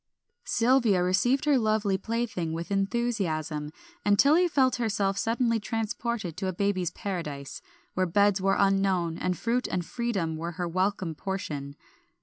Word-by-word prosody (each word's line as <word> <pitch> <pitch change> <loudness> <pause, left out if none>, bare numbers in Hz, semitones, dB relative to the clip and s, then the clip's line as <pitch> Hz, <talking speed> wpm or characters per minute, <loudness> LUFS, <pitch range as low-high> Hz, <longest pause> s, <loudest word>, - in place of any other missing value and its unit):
Sylvia 230 -6 +3
received 245 +10 +2
her 290 -3 +4
lovely 215 -3 +1
plaything 220 -5 -2
with 170 +3 -5
enthusiasm, 195 -8 -1 0.3
and 205 0 +3
Tilly 315 - +5
felt 265 -6 +2
herself 205 -4 0
suddenly 230 +2 +1
transported 225 -4 -3
to 190 +1 -2
a 185 - -1
baby's 185 -2 0
Paradise, 150 -9 -5 0.3
where 185 0 +1
beds 200 +2 +3
were 195 0 +2
unknown 195 -4 +2
and 180 -1 -1
fruit 245 +2 0
and 180 -2 -2
freedom 195 -10 -2
were 170 +2 -4
her 175 0 -3
welcome 185 0 -1
portion. 150 -6 -5
195 Hz, 140 wpm, -27 LUFS, 175-230 Hz, 0.3 s, Tilly